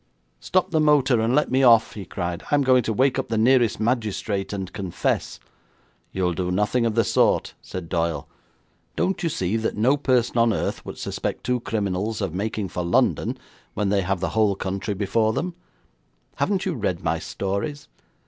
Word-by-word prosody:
'Stop 185 -2 0
the 160 - +2
motor 140 -6 +4
and 115 +3 +1
let 150 -3 +2
me 130 +1 +3
off,' 115 -3 +5
he 100 -3 -7
cried. 85 +2 -4
'I'm 145 -1 +3
going 130 -1 +5
to 115 - -2
wake 130 +4 +2
up 135 - -3
the 115 - 0
nearest 120 -1 +3
magistrate 110 -4 -1
and 95 -2 -5
confess.' 95 -4 -2 0.7
'You'll 90 -2 0
do 90 +1 -2
nothing 105 +6 +1
of 110 - -2
the 115 - +4
sort,' - - +2
said 90 -3 -7
Doyle. 85 -3 -1 0.7
'Don't 190 - 0
you 170 - 0
see 95 - -1
that 110 -1 -2
no 130 +7 +3
person 125 -4 +1
on 115 -1 +4
earth - - -2
would - - -7
suspect - - -4
two 125 0 0
criminals 105 -1 -2
of 95 -6 -2
making 105 +1 -2
for 90 - -3
London 85 - +1 0.4
when 105 -2 0
they 100 0 +2
have 95 0 -2
the 95 - 0
whole 105 -2 +2
country 95 +2 -3
before 110 +3 +1
them? 180 +7 -2 0.8
Haven't 195 -2 0
you 185 - 0
read 90 - -2
my - - 0
stories? 100 +10 -4
110 Hz, 185 wpm, -24 LUFS, 95-125 Hz, 0.8 s, off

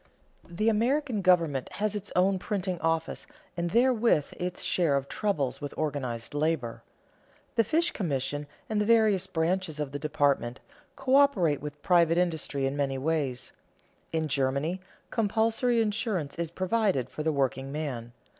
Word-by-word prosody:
The 180 +6 -1
American 235 +1 +1
government 165 -8 +2
has 210 0 -1
its 205 0 -5
own 190 +1 +3
printing 185 -3 -2
office 165 0 -1 0.3
and 170 0 -1
therewith 235 - +3
its 180 0 -4
share 160 -6 +2
of 140 0 -3
troubles 155 -12 -1
with 145 - -5
organized 135 -7 -3
labor. 145 -6 -1 0.7
The 230 - +3
fish 330 - +1
commission, 145 - -2 0.2
and 215 -1 0
the - - +1
various 215 -4 +4
branches 165 -2 -1
of 145 -2 -2
the 145 - -4
department, 140 -4 0 0.4
coöperate 265 - +3
with 150 0 -8
private 170 -2 +4
industry 160 -6 0
in 135 +1 -1
many 140 -2 -1
ways. 135 -4 -2 0.6
In 160 -1 0
Germany, 140 +6 0 0.3
compulsory 225 +2 +1
insurance 210 - -2
is 170 -2 -1
provided 185 - 0
for 155 - -6
the 160 +1 +1
workingman. 135 -2 -2
165 Hz, 140 wpm, -28 LUFS, 145-210 Hz, 0.7 s, various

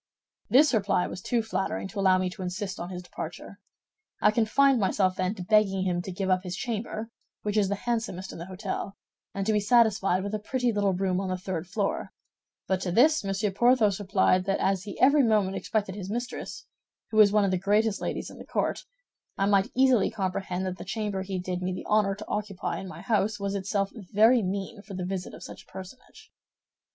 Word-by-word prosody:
This 290 +2 +5
reply 200 -4 +2
was 185 - -6
too 235 +3 0
flattering 195 -3 -2
to 205 - -6
allow 190 -1 +5
me 185 0 0
to 190 - -9
insist 190 +2 -4
on 175 - -5
his 180 -1 -6
departure. - - -8 0.6
I 210 - +5
confined 245 +4 +3
myself 190 -2 +1
then 185 +3 -1
to 185 - -6
begging 195 -1 +3
him 175 -2 0
to 190 - -6
give 190 +1 -3
up 185 -1 +2
his 180 -1 -5
chamber, 225 +1 -4 0.3
which 210 0 -2
is 205 -3 +3
the 200 - 0
handsomest 225 -4 -3
in - - -9
the 170 - -6
hôtel, 190 +1 -4 0.4
and 195 -1 -2
to 220 - +2
be 210 - +3
satisfied 205 -4 +3
with 200 +1 -4
a 215 - -1
pretty 245 +3 0
little 200 -2 +1
room 185 0 0
on 190 - -3
the 185 - -1
third 180 -2 -4
floor; 200 +1 -2 0.5
but 190 -1 0
to 180 - -2
this 295 - +4
Monsieur 195 +1 -1
Porthos 215 -2 +3
replied 190 -2 +2
that 195 0 +1
as 195 0 0
he 200 - -7
every 280 +3 +6
moment 210 -5 +2
expected 205 -3 -2
his 195 -1 -6
mistress, 240 +3 -5 0.5
who 215 - -2
was 210 -2 +7
one 210 -1 +3
of 195 - +1
the 185 - +1
greatest 210 +2 +1
ladies - - -3
in - - -13
the - - -8
court, - - -2 0.5
I 195 - +2
might 200 -1 +2
easily 260 -5 +4
comprehend 185 -1 -3
that 185 0 -4
the - - -6
chamber 205 -1 -3
he 190 0 -4
did 180 0 -3
me 185 0 -1
the - - -6
honor 210 -2 +2
to 215 +2 -10
occupy 200 -5 -3
in 190 - -7
my 185 - -9
house 215 -2 0
was 200 0 -2
itself 200 0 -1
very 220 +3 +3
mean 200 +2 -4
for 200 -1 -9
the 180 -1 -3
visit 185 -1 -4
of - - -11
such - - -9
a - - -24
personage. 190 +7 -12
195 Hz, 215 wpm, -27 LUFS, 185-215 Hz, 0.6 s, was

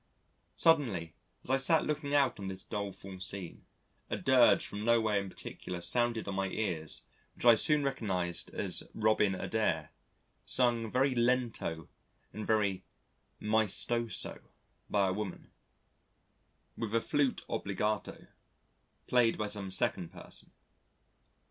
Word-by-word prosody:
Suddenly 115 - +2 0.3
as - - -4
I 135 - +4
sat 160 +4 +3
looking 150 -1 -2
out 135 -6 +3
on 100 - -5
this 95 0 -6
doleful 100 -2 -6
scene, 95 -2 -4 0.4
a - - -1
dirge - - +5
from 105 +1 -6
nowhere 110 -3 +3
in 100 -1 -5
particular 90 -1 -7
sounded 120 +5 0
on 100 - -2
my 95 0 0
ears 90 -6 -3 0.3
which - - -7
I 120 - +10
soon 150 +6 +4
recognised 95 -10 -2
as - - -1
"Robin 105 -2 +2
Adair," 85 -7 -1 0.5
sung 120 -3 +2
very 130 +3 +2
lento 120 -9 0 0.5
and 110 0 -6
very 100 -4 +1 0.6
maestoso 110 +2 +1 0.5
by 100 -2 +2
a - - 0
woman, 105 -2 -6 1.2
with 115 -1 -3
a 115 - +3
flute 145 -1 0
obligato 105 0 -2 0.8
played 120 -2 +3
by 105 - -1
some 100 -2 -4
second 90 -2 0
person. - - -12
110 Hz, 125 wpm, -32 LUFS, 95-120 Hz, 1.2 s, I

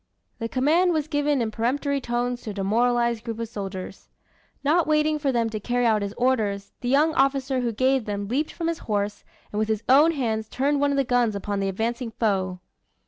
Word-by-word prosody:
The 230 -1 -3
command 325 +9 +3
was 310 -2 -1
given 290 -4 +1
in 220 - -3
peremptory 275 +5 -1
tones 245 0 -2
to - - -7
a - - -4
demoralized 235 +3 +1
group 225 -1 -5
of 230 0 -3
soldiers. 195 -3 -7 0.5
Not 315 +4 +3
waiting 305 0 +2
for 285 -2 +1
them 235 -2 +1
to 215 - -3
carry 245 +3 0
out 220 -2 +3
his 200 +1 -4
orders, 215 -6 0
the 245 - -2
young 300 +4 +3
officer 270 -1 +1
who 240 -2 0
gave 260 +2 +1
them 205 -1 -3
leaped 280 +8 -1
from 330 - -4
his 335 0 -2
horse, 205 0 -1 0.3
and 210 - -2
with 215 - +1
his 220 0 -1
own 295 +6 +6
hands 220 -6 -2
turned 280 +2 0
one 285 - +3
of 280 - 0
the 275 - +3
guns 245 -4 +1
upon 200 0 -3
the 195 0 0
advancing 230 +5 -2
foe. 190 -5 -1
240 Hz, 210 wpm, -25 LUFS, 215-280 Hz, 0.5 s, own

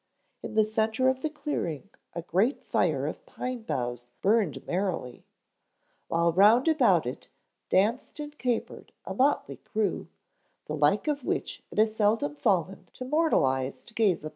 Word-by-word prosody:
In - - -7
the 215 -1 +5
centre 220 +4 +1
of 260 0 0
the 310 - -1
clearing 200 - -4 0.2
a 170 - -5
great 200 - +1
fire - - +1
of - - -5
pine 255 - -5
boughs 120 - -3
burned 205 -6 +2
merrily, 175 -9 -3 0.8
while 170 0 +2
round 215 - +5
about 240 - +4
it 125 - -6 0.4
danced 225 +10 +1
and 295 0 -6
capered 245 -2 -3
a - - -4
motley 275 +3 +1
crew, 210 -4 -2 0.6
the 150 - -5
like 150 - +2
of 290 -3 -1
which - - -3
it - - -11
has 215 0 +3
seldom 205 -9 +1
fallen 185 +3 0
to 255 - -7
mortal 310 - +3
eyes 130 0 -2
to 235 - -14
gaze 210 -6 +2
upon. 155 - -4
210 Hz, 160 wpm, -28 LUFS, 165-255 Hz, 0.8 s, the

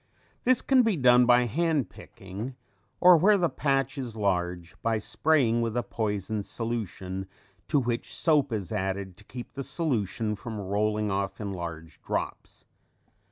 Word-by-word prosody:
This 255 0 +4
can 265 -2 +5
be 225 -6 +1
done 125 -2 +6
by 125 0 +5
hand 155 +2 0
picking, 105 +5 -8 0.4
or 180 -1 +8
where 200 +6 +5
the 175 -3 +1
patch 135 -1 0
is 120 -4 -5
large 90 -4 -1
by 115 -1 +1
spraying 120 +2 +2
with 115 0 -1
a 120 - +1
poison 105 -3 -2
solution 100 -4 -4 0.4
to 150 - +3
which 120 -2 -3
soap 150 -5 +3
is 100 -6 -3
added 95 -2 -2
to - - -16
keep 120 +3 -9
the 140 - -5
solution 115 - -1
from 110 0 -6
rolling 105 +2 0
off 100 0 -2
in 100 -2 -4
large 80 -3 -7
drops. - - -4
115 Hz, 155 wpm, -27 LUFS, 100-135 Hz, 0.4 s, or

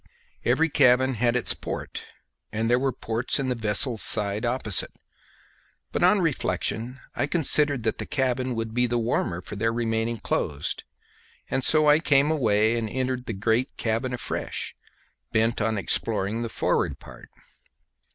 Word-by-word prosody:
Every 160 - +3
cabin 130 -2 +4
had 120 +1 +1
its 125 - +1
port, - - -6 0.5
and 115 +2 -1
there 125 - +4
were 135 0 +1
ports 115 0 -2
in 135 -2 -1
the - - +1
vessel's 110 +1 0
side 105 +1 +2
opposite; 120 -6 0 1.0
but - - -2
on 185 +3 +5
reflection 130 -5 -2 0.2
I 140 - 0
considered 145 -4 +2
that 110 - -1
the - - -4
cabin 130 -2 0
would 115 -1 -3
be 125 +1 +2
the 120 0 0
warmer 110 -7 -1
for - - -8
their 115 +3 0
remaining 115 0 -1
closed, 75 -7 -2 0.7
and 135 - 0
so 155 +1 +4
I 150 +1 +6
came 145 -2 +3
away 110 -5 +2
and 110 -1 -3
entered 130 +1 -2
the 115 - -2
great 110 +5 0
cabin 115 +3 -1
afresh, 125 - -4 0.6
bent 115 +1 +1
on 110 0 0
exploring 100 +3 0
the 115 - -3
forward - - 0
part. - - -14
120 Hz, 155 wpm, -25 LUFS, 110-130 Hz, 1.0 s, I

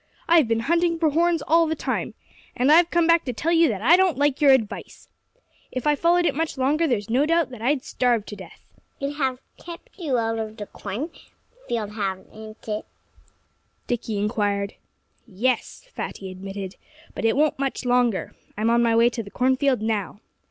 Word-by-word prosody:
I've 330 -6 +5
been 225 0 0
hunting 335 +5 +1
for 320 -2 +2
horns 335 0 +2
all 330 +1 +3
this 320 0 -2
time. - - -3 0.4
And 255 +4 +3
I've 340 +2 +6
come 345 -1 +2
back 335 0 +4
to 250 - -3
tell 315 +9 -1
you 335 -1 +5
that 210 -5 -3
I 320 +8 +7
don't 370 -4 +2
like 290 0 +1
your 290 - +6
advice. 255 -6 0 0.6
If 255 - -4
I 300 - +4
followed 345 +3 +2
it - - +2
much 320 0 -2
longer 295 +5 +2
there's 220 -7 -1
no 260 +6 +2
doubt 330 -3 +2
that 245 -3 -10
I'd 265 +3 +1
starve 240 -4 +1
to 210 - -8
death." - - -12 0.4
"It 275 0 -2
has 265 -3 0 0.3
kept 345 +8 -10
you 290 -8 0
out 225 -1 -1
of 220 0 -5
the 205 - -6
cornfield, 280 - -7 0.7
hasn't 215 +2 -6
it?" 210 0 -3 1.0
Dickie 230 -3 -3
inquired. 205 -1 -1 0.5
"Yes!" 235 - -2
Fatty 190 -1 -6
admitted. 195 0 -7 0.4
"But - - -6
it 225 +3 +2
won't 300 -2 +2
much 270 -1 -2
longer. 245 -4 +1 0.2
I'm 220 +2 +1
on 235 0 +4
my 230 -1 +3
way 235 +1 +4
to 235 - -4
the 200 - -10
cornfield 260 0 +1
now." 210 -3 -2
255 Hz, 185 wpm, -24 LUFS, 220-315 Hz, 1.0 s, I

